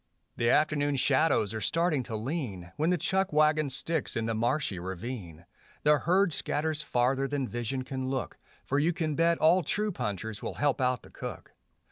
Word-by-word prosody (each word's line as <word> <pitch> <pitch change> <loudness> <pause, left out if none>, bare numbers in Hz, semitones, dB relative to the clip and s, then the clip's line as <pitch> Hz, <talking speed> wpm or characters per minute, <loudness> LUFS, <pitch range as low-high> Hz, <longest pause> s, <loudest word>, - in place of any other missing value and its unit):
The 120 0 +1
afternoon 145 -1 +2
shadows 130 -5 +2
are 110 - -4
starting 165 -1 +1
to 115 - -5
lean, 110 - -4
When 155 +3 +1
the 180 - +2
chuck 190 +1 0
wagon 155 -1 +3
sticks 150 +2 -1
in 115 - -1
the 115 - -1
marshy 115 -2 0
ravine; 90 -2 -6 0.4
The 150 0 +5
herd 180 +4 +2
scatters 150 +1 -1
farther 130 0 +1
than 140 -2 -2
vision 120 +3 -3
can 130 0 -4
look, 130 -4 -3 0.3
For 140 - +1
you 165 +4 +2
can 160 -2 -1
bet 165 +1 +3
all 170 +4 +5
true 210 +4 -1
punchers 105 - -4
will - - -5
help 145 -2 +1
out 125 -2 +1
the - - -15
cook. - - -8
135 Hz, 180 wpm, -29 LUFS, 115-155 Hz, 0.4 s, The